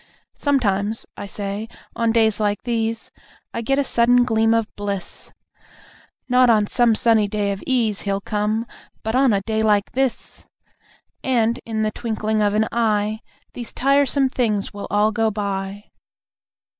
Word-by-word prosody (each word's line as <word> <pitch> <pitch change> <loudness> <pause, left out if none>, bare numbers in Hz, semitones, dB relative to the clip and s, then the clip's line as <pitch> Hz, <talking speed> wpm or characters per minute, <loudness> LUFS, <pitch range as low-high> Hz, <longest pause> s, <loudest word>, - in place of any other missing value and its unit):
Sometimes, 220 -6 0
I 200 - -7
say, 200 +2 -4 0.3
on 230 -1 +1
days 220 -2 +2
like 205 -1 0
these, 225 -1 -2 0.4
I 230 - -3
get 270 +4 0
a 285 - +2
sudden 245 -1 +4
gleam 225 -1 +2
of 230 -1 +2
bliss. 200 -3 -5 1.0
"Not 250 -1 +4
on 215 -2 +4
some 235 +1 +3
sunny 220 -2 +3
day 205 -1 -1
of 195 - -5
ease, 230 -6 +1
He'll 195 -1 -1
come.. 210 +3 -1 0.4
but 220 - -2
on 260 0 +4
a 200 -1 +1
day 220 +1 -1
like 210 -2 +2
this!" 265 -1 -2 0.8
And, 235 -2 +1
in 220 -1 -1
the 215 - 0
twinkling 220 -1 -2
of 205 0 +2
an 215 +1 +2
eye, 215 -2 0 0.3
These 240 -2 -6
tiresome 275 0 +3
things 215 -6 -1
will 200 - -6
all 210 +1 +2
go 225 0 +1
by! 200 -1 -4
220 Hz, 155 wpm, -21 LUFS, 205-235 Hz, 1.0 s, sudden